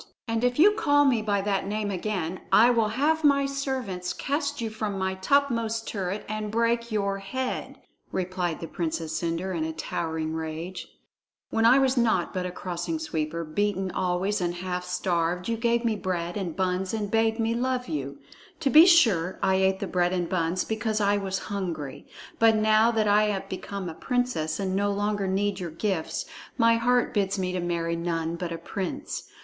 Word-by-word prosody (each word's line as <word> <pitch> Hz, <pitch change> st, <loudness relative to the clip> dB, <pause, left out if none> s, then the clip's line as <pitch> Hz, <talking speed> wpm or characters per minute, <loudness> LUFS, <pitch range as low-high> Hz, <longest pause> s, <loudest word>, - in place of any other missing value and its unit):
"And 225 Hz, 0 st, -1 dB
if 245 Hz, 0 st, +1 dB
you 375 Hz, +7 st, +7 dB
call 290 Hz, -10 st, +3 dB
me 245 Hz, -5 st, +3 dB
by 205 Hz, -2 st, 0 dB
that 195 Hz, -1 st, -1 dB
name 210 Hz, 0 st, -2 dB
again, 185 Hz, -2 st, -3 dB
I 235 Hz, +3 st, +7 dB
will 230 Hz, -3 st, +2 dB
have 295 Hz, +8 st, +1 dB
my 280 Hz, -1 st, +4 dB
servants 260 Hz, -10 st, -3 dB
cast 290 Hz, 0 st, -2 dB
you 225 Hz, -2 st, -3 dB
from 215 Hz, -2 st, -3 dB
my 190 Hz, 0 st, -1 dB
topmost 230 Hz, +1 st, +1 dB
turret 195 Hz, 0 st, -3 dB
and 215 Hz, 0 st, -3 dB
break 235 Hz, +1 st, 0 dB
your 200 Hz, -2 st, 0 dB
head," 255 Hz, +6 st, -4 dB, 0.3 s
replied 180 Hz, -2 st, -2 dB
the 165 Hz, -, -4 dB
Princess 160 Hz, -2 st, -3 dB
Cendre 170 Hz, +3 st, -2 dB
in 160 Hz, -, -1 dB
a 160 Hz, -, -2 dB
towering 160 Hz, 0 st, -3 dB
rage. 160 Hz, +3 st, -5 dB, 0.6 s
"When 225 Hz, 0 st, +3 dB
I 250 Hz, +3 st, +7 dB
was 265 Hz, -1 st, +2 dB
naught 220 Hz, -7 st, +2 dB
but 180 Hz, -1 st, -2 dB
a -, -, -5 dB
Crossing 180 Hz, -, -4 dB
Sweeper, 165 Hz, -, -3 dB
beaten 190 Hz, +3 st, -1 dB
always 185 Hz, +4 st, 0 dB
and 175 Hz, 0 st, -1 dB
half 180 Hz, 0 st, -4 dB
starved, 180 Hz, 0 st, -1 dB
you 230 Hz, -, 0 dB
gave 235 Hz, +1 st, +1 dB
me 225 Hz, -2 st, +2 dB
bread 175 Hz, -3 st, -3 dB
and 185 Hz, -6 st, -3 dB
buns 185 Hz, +1 st, -1 dB
and 205 Hz, -2 st, -3 dB
bade 225 Hz, 0 st, +2 dB
me 225 Hz, 0 st, +1 dB
love 250 Hz, +1 st, -1 dB
you. 140 Hz, -4 st, -4 dB, 0.4 s
To 275 Hz, -, +1 dB
be 320 Hz, +3 st, +9 dB
sure, 210 Hz, -, +4 dB
I 190 Hz, -, +3 dB
ate 190 Hz, 0 st, +2 dB
the 200 Hz, -, -2 dB
bread 180 Hz, -1 st, +1 dB
and 175 Hz, -2 st, 0 dB
buns 175 Hz, 0 st, 0 dB
because 220 Hz, -1 st, -1 dB
I 205 Hz, 0 st, +3 dB
was 195 Hz, -1 st, -2 dB, 0.2 s
hungry. 165 Hz, -9 st, -4 dB, 0.3 s
But 225 Hz, -1 st, +6 dB
now 215 Hz, +1 st, +4 dB
that 220 Hz, -2 st, +1 dB
I 210 Hz, +1 st, +5 dB
am 205 Hz, -2 st, -1 dB
become 190 Hz, 0 st, -5 dB
a 165 Hz, -, -5 dB
princess 245 Hz, -8 st, -1 dB
and 190 Hz, -1 st, -1 dB
no 205 Hz, +1 st, +1 dB
longer 205 Hz, 0 st, -1 dB
need 195 Hz, +1 st, 0 dB
your 175 Hz, -2 st, -4 dB
gifts, 185 Hz, -, -2 dB, 0.3 s
my 230 Hz, -1 st, +5 dB
heart 245 Hz, +1 st, +2 dB
bids 200 Hz, -2 st, 0 dB
me 185 Hz, -1 st, -1 dB
to 185 Hz, -, -2 dB
marry 170 Hz, -1 st, -1 dB
none 165 Hz, -1 st, -2 dB
but 170 Hz, 0 st, -4 dB
a 165 Hz, -, -3 dB
prince. 180 Hz, +2 st, -5 dB
200 Hz, 190 wpm, -26 LUFS, 175-230 Hz, 0.6 s, be